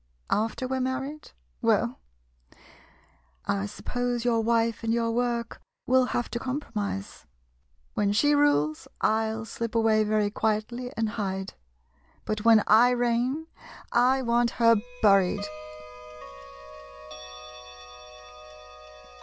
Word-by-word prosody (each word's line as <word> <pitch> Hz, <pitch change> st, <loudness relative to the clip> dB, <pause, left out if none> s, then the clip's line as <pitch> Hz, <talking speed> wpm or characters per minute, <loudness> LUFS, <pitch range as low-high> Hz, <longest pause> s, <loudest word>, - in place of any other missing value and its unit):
After 225 Hz, +4 st, 0 dB
we 265 Hz, +1 st, -2 dB
're -, -, -1 dB
married? 270 Hz, +4 st, -4 dB, 0.3 s
Well -, -, +1 dB, 0.8 s
— 65 Hz, -1 st, -32 dB, 0.2 s
I 100 Hz, -, -3 dB
suppose 245 Hz, -, -3 dB
your 230 Hz, -2 st, +2 dB
wife 230 Hz, 0 st, 0 dB
and 225 Hz, -, 0 dB
your 230 Hz, 0 st, +1 dB
work 235 Hz, 0 st, -2 dB, 0.2 s
will 255 Hz, 0 st, +4 dB
have 240 Hz, -1 st, -2 dB
to 235 Hz, -, -3 dB
compromise. 225 Hz, -, -5 dB, 0.7 s
When 205 Hz, -1 st, +1 dB
she 290 Hz, +8 st, +3 dB
rules, 155 Hz, -, +2 dB
I 220 Hz, +1 st, +2 dB
'11 220 Hz, 0 st, -4 dB
slip 230 Hz, 0 st, -5 dB
away 220 Hz, -1 st, +3 dB
very 210 Hz, -1 st, +1 dB
quietly, 220 Hz, +4 st, -2 dB
and 225 Hz, 0 st, +1 dB
hide 195 Hz, -3 st, -4 dB, 0.4 s
— -, -, -36 dB
but 215 Hz, -1 st, -3 dB
when 225 Hz, -2 st, +6 dB
I 230 Hz, +3 st, +6 dB
reign, 245 Hz, +5 st, 0 dB, 0.5 s
I 255 Hz, +2 st, +3 dB
want 235 Hz, 0 st, +2 dB
her 230 Hz, -1 st, +5 dB, 0.3 s
buried! 195 Hz, -3 st, +4 dB
230 Hz, 115 wpm, -27 LUFS, 215-245 Hz, 0.8 s, when